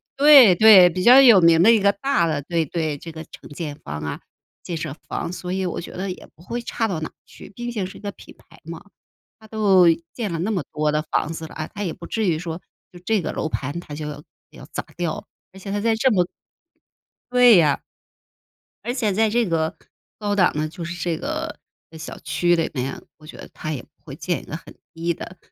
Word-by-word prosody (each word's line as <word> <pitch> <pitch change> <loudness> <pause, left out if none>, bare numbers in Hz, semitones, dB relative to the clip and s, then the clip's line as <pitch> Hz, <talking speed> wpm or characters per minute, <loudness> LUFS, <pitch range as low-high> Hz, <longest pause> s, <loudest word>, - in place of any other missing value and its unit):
嗯 - - -68 0.2
对 270 -10 +9
对， 195 -2 +8
比 180 +2 -3
较 250 +6 +8
有 235 -8 +8
名 165 0 +6
的 225 - +7
一 225 - +5
个 200 0 +4
大 270 -3 0
的 155 -3 -1
对 165 +2 -1
对， 155 -1 -2
这 165 +3 -9
个 160 - -8
承 - - -13
建 145 0 -6
方 75 +1 -5
啊， 75 -1 -5 0.4
建 170 - -5
设 155 -3 -5
方， - - -3
所 180 0 -5
以 190 0 -1
我 175 - -4
觉 - - -9
得 190 +1 -4
也 180 - -8
不 165 - -19
会 235 +6 -5
差 225 -1 -2
到 175 -6 -3
哪 160 - -5 0.2
去， - - -14
毕 240 +2 -5
竟 205 -5 -2
是 190 - -11
一 - - -15
个 205 - -4
品 - - -15
牌 165 - -21
嘛。 165 0 -8 0.6
它 220 - -16
都 205 -4 +4 0.3
建 220 -6 -4
了 165 - -3
那 190 +6 -1
么 185 -7 -1
多 150 0 0
的 150 0 0
房 155 0 -1
子 160 0 -7
了， - - -14
啊 155 - -5
它 205 - -4
也 170 -5 -3
不 170 -2 -11
至 220 -3 -1
于 165 -3 +1
说 165 -1 -5 0.3
就 175 - -13
这 220 -3 +1
个 - - -3
楼 - - -2
盘 145 +4 -4
它 150 -4 -9
就 150 0 -6
要 145 -1 -8 0.3
要 - - -13
砸 - - -3
掉， 170 -3 -3 0.3
而 190 - -12
且 195 +1 -7
它 205 - -1
在 225 +1 +2
这 255 +4 +2
么 185 -5 +3 1.1
对 250 -2 +7
呀。 150 -6 +3 1.0
而 240 - -2
且 225 -6 0
在 220 +2 +2
这 235 +2 +1
个 160 -2 -1 0.4
高 205 -1 -2
档 185 -3 +4
的 155 +1 -1
就 165 +2 -9
是 170 +1 -5
这 170 -2 -1
个 - - -4 0.4
小 160 - -8
区 175 0 +1
里 165 -1 -1
面， 130 -1 -4 0.2
我 155 - -16
觉 - - -11
得 - - -11
它 155 - -5
也 135 - -5
不 - - -23
会 - - -9
建 - - -3
一 - - -16
个 - - -6
很 - - -15 0.2
低 170 +1 -2
的 185 +3 -10
175 Hz, 255 characters per minute, -22 LUFS, 160-210 Hz, 1.1 s, 对